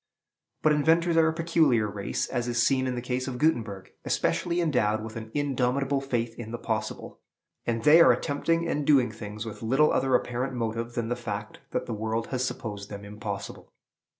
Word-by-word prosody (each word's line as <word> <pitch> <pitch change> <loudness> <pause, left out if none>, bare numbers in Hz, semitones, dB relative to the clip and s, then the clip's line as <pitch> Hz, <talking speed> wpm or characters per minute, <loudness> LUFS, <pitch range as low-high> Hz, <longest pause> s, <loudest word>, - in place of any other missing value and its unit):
But 155 - +5
inventors 165 +3 +3
are 165 -1 +5
a - - +3
peculiar 160 -9 +2
race, 100 -1 -2
as 120 -2 -2
is 120 0 +2
seen 130 -1 +2
in 125 - -1
the 120 - -4
case 125 +1 -2
of 130 -2 -4
Gutenberg, 115 -10 0
especially 175 0 0
endowed 110 -10 +1
with 110 0 -7
an 110 -1 -6
indomitable 135 -1 0
faith 120 -4 -2
in 115 -2 -6
the 120 - -4
possible; 110 -2 -4 0.5
and 115 -1 -1
they 155 +5 +8
are - - +8
continually - - -7
attempting 165 +4 0
and 150 -3 -1
doing 130 -6 +5
things 105 0 -7
with 110 - -7
little 135 +7 +3
other 130 -1 +2
apparent 125 +2 -1
motive 115 0 -3
than 115 -1 -2
the 120 - 0
fact 105 -3 -6
that - - -2
the 120 - -4
world 110 +1 -2
has 130 -1 -1
supposed 105 -5 -4
them 100 -1 -8
impossible. 105 -1 -6
120 Hz, 195 wpm, -27 LUFS, 110-140 Hz, 0.5 s, they